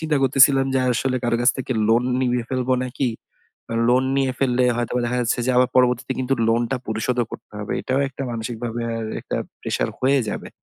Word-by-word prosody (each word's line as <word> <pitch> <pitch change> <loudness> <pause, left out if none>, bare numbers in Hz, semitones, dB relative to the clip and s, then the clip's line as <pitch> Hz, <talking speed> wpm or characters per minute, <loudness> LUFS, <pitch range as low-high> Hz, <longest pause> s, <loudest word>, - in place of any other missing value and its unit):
চিন্তা 160 -2 0
করতেছিলাম 135 0 +5
যে, 130 - +3
আসলে 130 +2 0
কারো 120 -1 +2
কাছ 125 - +6
থেকে 130 0 -2 0.2
লোন 115 +2 +3 0.2
নিয়ে 125 -2 0
ফেলবো 130 0 0
নাকি? 130 +1 -2 0.6
আ - - -1
লোন 130 +1 +4
নিয়ে 135 -1 +1
ফেললে 125 -2 +2
হয়তো 120 -1 -2
বা 125 - +1
দেখা 125 +1 -1
যাচ্ছে 120 0 0
যে, - - +3
আবার 125 0 +4
পরবর্তীতে 125 0 +2
কিন্তু 130 +1 0
লোন 115 +1 +3
টা 135 - +1
পরিশোধ 110 +3 -1
ও - - -9
করতে - - -10
হবে। 105 - -4
এটাও 130 +1 0
একটা 135 - -8
মানসিকভাবে 115 +1 -4 0.2
আরএকটা 110 -1 -4 0.2
প্রেশার - - -1
হয়ে 135 +2 +3
যাবে। - - -5
125 Hz, 205 wpm, -22 LUFS, 120-130 Hz, 0.6 s, কাছ